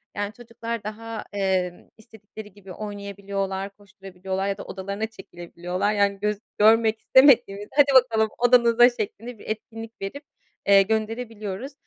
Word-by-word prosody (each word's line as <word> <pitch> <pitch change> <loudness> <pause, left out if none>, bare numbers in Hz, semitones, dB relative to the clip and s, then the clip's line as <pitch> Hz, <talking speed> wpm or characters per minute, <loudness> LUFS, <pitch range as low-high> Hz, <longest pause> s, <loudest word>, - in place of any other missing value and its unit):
Yani, 205 +1 -3
çocuklar 230 -1 -7
daha, 225 +2 -6
eee, 190 -3 -1
istedikleri 220 -2 -13
gibi 195 -2 -13
oynayabiliyorlar, 200 -1 -5
koşturabiliyorlar 195 -1 -6
ya 200 0 -2
da - - -7
odalarına 200 +3 -4
çekilebiliyorlar. 180 -1 -4
Yani, 200 -1 +1
göz 210 0 -1 0.2
görmek 220 +1 +4
istemediğimizde 235 -7 +4
hadi 290 -1 +6 0.2
bakalım 220 -3 0
odanıza 240 0 +5
şeklinde 230 0 -6
bir - - -13
etkinlik 225 +1 -7
verip, 280 +10 -6 0.4
eee, 200 0 +7
gönderebiliyoruz 220 +2 -3
210 Hz, 125 wpm, -24 LUFS, 195-225 Hz, 0.4 s, eee